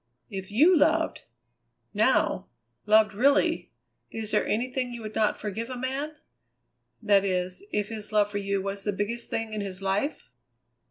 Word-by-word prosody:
If 190 Hz, -1 st, -5 dB
you 305 Hz, -, +5 dB
loved, 320 Hz, +1 st, +2 dB, 0.7 s
now, 215 Hz, +6 st, +2 dB, 0.4 s
loved 215 Hz, 0 st, +5 dB
really, 275 Hz, +7 st, +2 dB, 0.4 s
is 220 Hz, -1 st, -5 dB
there 210 Hz, -, +2 dB
anything 250 Hz, +2 st, -1 dB
you 235 Hz, -1 st, -7 dB
would 215 Hz, 0 st, -6 dB
not 215 Hz, -1 st, +1 dB
forgive 220 Hz, +3 st, -4 dB
a 255 Hz, -, -5 dB
man? 270 Hz, +4 st, -3 dB, 0.9 s
That 200 Hz, -1 st, +4 dB
is, 185 Hz, -1 st, -1 dB
if 210 Hz, -1 st, -1 dB
his 215 Hz, -2 st, -7 dB
love 210 Hz, -1 st, +3 dB
for 205 Hz, -, -2 dB
you 200 Hz, -1 st, -1 dB
was 195 Hz, 0 st, -4 dB
the 205 Hz, -, -1 dB
biggest 215 Hz, +4 st, -2 dB
thing 225 Hz, -1 st, -3 dB
in 215 Hz, -, -2 dB
his 190 Hz, -2 st, -5 dB
life?" 195 Hz, +9 st, -2 dB
215 Hz, 160 wpm, -27 LUFS, 200-250 Hz, 0.9 s, you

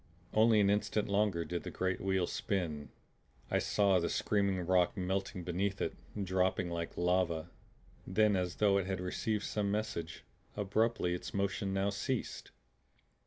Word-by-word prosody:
Only 110 Hz, 0 st, +5 dB
an 100 Hz, 0 st, +4 dB
instant 105 Hz, +1 st, 0 dB
longer 100 Hz, -4 st, +1 dB
did 85 Hz, +2 st, -3 dB
the -, -, -6 dB
great 95 Hz, 0 st, -2 dB
wheel 95 Hz, -2 st, +1 dB
spin. 85 Hz, -7 st, -2 dB, 0.6 s
I -, -, +3 dB
saw 100 Hz, -3 st, +3 dB
the 85 Hz, -, -1 dB
screaming 100 Hz, -3 st, +1 dB
rock 90 Hz, 0 st, +3 dB
melting 95 Hz, 0 st, -2 dB
beneath 95 Hz, +3 st, -1 dB
it, -, -, -1 dB, 0.3 s
dropping 95 Hz, -1 st, +1 dB
like 85 Hz, -1 st, -4 dB
lava. 85 Hz, -2 st, +1 dB, 0.6 s
Then, 105 Hz, +2 st, +3 dB
as 90 Hz, -1 st, -1 dB
though 100 Hz, -2 st, +3 dB
it 95 Hz, -, -3 dB
had 95 Hz, -1 st, -2 dB
received 100 Hz, +3 st, -2 dB
some 105 Hz, -2 st, -1 dB
message, 100 Hz, -6 st, -3 dB, 0.3 s
abruptly 105 Hz, -2 st, +1 dB
its 90 Hz, -, -5 dB
motion 100 Hz, 0 st, -1 dB
now 95 Hz, +1 st, +1 dB
ceased. 120 Hz, +5 st, -3 dB
95 Hz, 150 wpm, -33 LUFS, 90-100 Hz, 0.6 s, Only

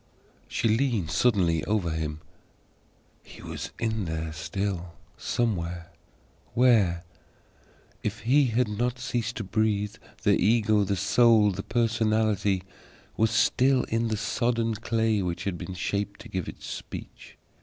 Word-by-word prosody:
She 115 Hz, -, 0 dB
leaned 110 Hz, -, +1 dB
suddenly 85 Hz, -4 st, +2 dB
over 105 Hz, -6 st, 0 dB
him. 80 Hz, -1 st, -3 dB, 1.0 s
HE -, -, -14 dB
was -, -, -6 dB
in 110 Hz, -3 st, -1 dB
there 80 Hz, -1 st, -3 dB
still, 90 Hz, +1 st, -3 dB, 0.2 s
somewhere. 85 Hz, -7 st, -2 dB, 0.6 s
Where? 105 Hz, -9 st, +4 dB, 1.0 s
If -, -, -3 dB
he 135 Hz, +6 st, +4 dB
had 120 Hz, +1 st, +1 dB
not 120 Hz, +4 st, -1 dB
ceased 120 Hz, -2 st, -2 dB
to 110 Hz, -, -3 dB
breathe, 105 Hz, 0 st, 0 dB, 0.3 s
the -, -, +4 dB
Ego, 110 Hz, 0 st, +3 dB
the 100 Hz, -, 0 dB
Soul, 105 Hz, +2 st, +4 dB
the 95 Hz, +1 st, -4 dB
Personality 110 Hz, -4 st, +1 dB, 0.5 s
was 110 Hz, 0 st, +3 dB
still 130 Hz, +4 st, +3 dB
in 115 Hz, +1 st, +1 dB
the 110 Hz, -1 st, -1 dB
sodden 115 Hz, +1 st, 0 dB
clay 110 Hz, -1 st, 0 dB
which 90 Hz, -2 st, -3 dB
had 90 Hz, -4 st, -3 dB, 0.2 s
shaped 100 Hz, +2 st, -2 dB
to -, -, -11 dB
give 95 Hz, -3 st, -3 dB
it -, -, -11 dB
speech. -, -, -8 dB
105 Hz, 130 wpm, -27 LUFS, 90-115 Hz, 1.0 s, Where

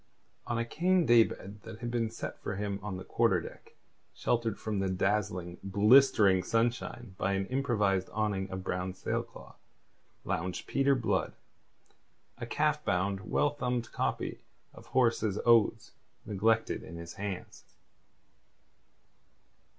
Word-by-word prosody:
On 120 Hz, -, -1 dB
a 115 Hz, -, 0 dB
cane 175 Hz, +7 st, +2 dB
day 120 Hz, -2 st, +7 dB
bed 105 Hz, -1 st, -8 dB
that 110 Hz, 0 st, -9 dB
had 120 Hz, 0 st, -5 dB
been 115 Hz, -2 st, 0 dB
set 115 Hz, -, -7 dB
for 105 Hz, -, -3 dB
him 100 Hz, 0 st, -3 dB
on 100 Hz, -3 st, -4 dB
the 95 Hz, -, -7 dB
quarter -, -, +2 dB
deck, -, -, -11 dB, 0.4 s
sheltered 115 Hz, -3 st, 0 dB
from 105 Hz, -2 st, -3 dB
the 95 Hz, -1 st, 0 dB
dazzling, 95 Hz, -2 st, -1 dB
blistering 100 Hz, -1 st, +5 dB
sunshine 115 Hz, +1 st, -1 dB
by 100 Hz, -, +1 dB
an 95 Hz, 0 st, 0 dB
improvised 105 Hz, -8 st, +1 dB
awning 105 Hz, -3 st, -1 dB
of 95 Hz, 0 st, -5 dB
brown 90 Hz, 0 st, -3 dB
sailcloth, 95 Hz, -, -5 dB, 0.7 s
lounged 90 Hz, +2 st, -2 dB
Peter 135 Hz, 0 st, +2 dB
Blood, 125 Hz, -3 st, 0 dB, 1.1 s
a -, -, -5 dB
calf -, -, +1 dB
bound, 95 Hz, +1 st, -1 dB
well 145 Hz, -, +2 dB
thumbed 125 Hz, -5 st, -2 dB
copy -, -, -2 dB, 0.3 s
of -, -, -14 dB
Horace's 115 Hz, -5 st, +2 dB
Odes 115 Hz, -2 st, +4 dB, 0.3 s
neglected 110 Hz, +2 st, +1 dB
in 85 Hz, -, -10 dB
his 85 Hz, 0 st, -8 dB
hands. 100 Hz, -2 st, -6 dB
105 Hz, 135 wpm, -31 LUFS, 95-120 Hz, 1.1 s, day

